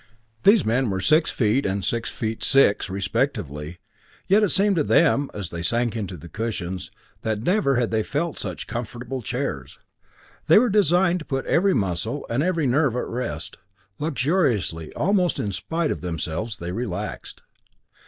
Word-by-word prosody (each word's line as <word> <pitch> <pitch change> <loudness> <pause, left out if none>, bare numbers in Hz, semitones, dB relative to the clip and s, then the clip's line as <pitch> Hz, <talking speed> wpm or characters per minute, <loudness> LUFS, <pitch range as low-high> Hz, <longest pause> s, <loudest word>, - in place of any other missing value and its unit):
These 200 - +5
men 120 +2 +1
were 95 -1 -1
six 155 - +4
feet 120 +3 +1
and 95 0 -1
six 115 -1 -1
feet 110 -1 -4
six, 135 -8 +3
respectively, 95 - -2 0.5
yet 200 +3 +4
it 210 - +3
seemed 200 -1 +3
to 155 - +3
them, 145 -3 +3
as 100 -5 -6
they 85 - -5
sank 120 +6 0
into 95 -5 -4
the 85 - -11
cushions, 95 -4 -4 0.3
that 110 -1 -2
never 180 - +2
had 120 -2 0
they 110 -1 +2
felt 150 +7 -2
such 90 -4 -3
comfortable 120 +2 -5
chairs. 105 - -4 0.7
They - - +7
were 235 0 +4
designed 180 -2 +3
to 155 - -9
put 135 -2 -2
every 190 +3 +3
muscle 100 +7 -2
and 120 +4 +1
every 165 -2 +1
nerve 135 -1 +2
at 125 - -1
rest. 125 +2 -5 0.4
Luxuriously, 130 - 0
almost 185 0 +1
in 105 - -2
spite 160 - -2
of - - -4
themselves, 85 +5 -3
they 85 +1 -5
relaxed. 105 -3 -5
120 Hz, 165 wpm, -24 LUFS, 100-160 Hz, 0.7 s, They